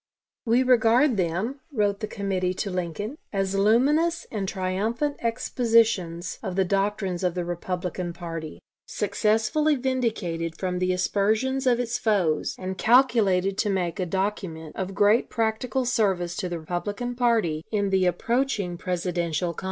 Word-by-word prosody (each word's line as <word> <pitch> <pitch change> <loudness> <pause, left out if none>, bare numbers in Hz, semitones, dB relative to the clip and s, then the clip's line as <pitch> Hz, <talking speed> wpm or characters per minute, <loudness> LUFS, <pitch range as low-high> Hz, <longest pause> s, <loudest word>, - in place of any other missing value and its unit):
"We 240 +3 +4
regard 250 +1 +4
them," 190 - -1
wrote 205 -5 0
the 215 - -3
committee 190 -3 -2
to 200 +1 -3
Lincoln, 185 - -4
"as 195 -1 -1
luminous 275 +12 +3
and 200 -4 -2
triumphant 215 +10 -1
expositions 225 -7 +1
of 190 -5 -4
the 190 0 +2
doctrines 195 -1 -1
of 180 -1 0
the 175 -1 -2
Republican 175 0 -3
party, 165 -3 -6 0.3
successfully 220 +9 +1
vindicated 220 - -2
from 180 -1 -2
the 185 0 +1
aspersions 215 +8 +1
of 245 -1 +3
its 240 -1 -1
foes, 185 -9 +1
and 185 0 -5
calculated 210 -6 +3
to 210 - +1
make 180 -3 -1
a 185 - -1
document 185 -4 -3
of 190 0 -4
great 205 +4 +3
practical 230 +3 -1
service 190 -8 +1
to 180 - -2
the 170 -1 -4
Republican 205 +9 -3
party 230 -11 +1
in 205 -2 0
the 190 -1 +3
approaching 215 -3 0
Presidential 175 -2 -1
contest." - - -8
200 Hz, 145 wpm, -25 LUFS, 180-230 Hz, 0.3 s, We